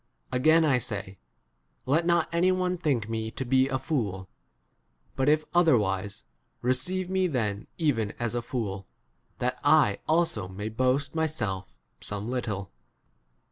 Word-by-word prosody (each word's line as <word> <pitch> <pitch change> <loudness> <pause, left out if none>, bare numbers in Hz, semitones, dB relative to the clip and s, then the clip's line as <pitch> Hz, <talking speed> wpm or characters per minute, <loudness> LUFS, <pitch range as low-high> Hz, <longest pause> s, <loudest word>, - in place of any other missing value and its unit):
16 125 - +1
Again 160 +3 +5
I 140 -4 +4
say, 100 -4 -5 0.7
Let 160 +6 +2
not 170 -2 +3
any 175 +2 +3
one 185 0 0
think 140 -11 0
me 110 0 -3
to 130 +4 -5
be 130 +1 +3
a 135 -1 -1
fool; 105 - -2 0.9
but 135 +1 +2
if 155 0 +3
otherwise, 105 - +2 0.4
receive 175 +10 +1
me 190 0 +1
then 110 - -2
even 120 - 0
as 120 -1 -2
a 120 - -1
fool, 105 -6 -4 0.5
that 125 +1 -1
I 145 -8 +4
also 165 - +1
may 100 +3 -5
boast 130 +5 +1
17 - - -21
myself 100 - -2 0.2
some 105 +1 -5
little. 105 -7 -3
130 Hz, 145 wpm, -27 LUFS, 105-155 Hz, 0.9 s, Again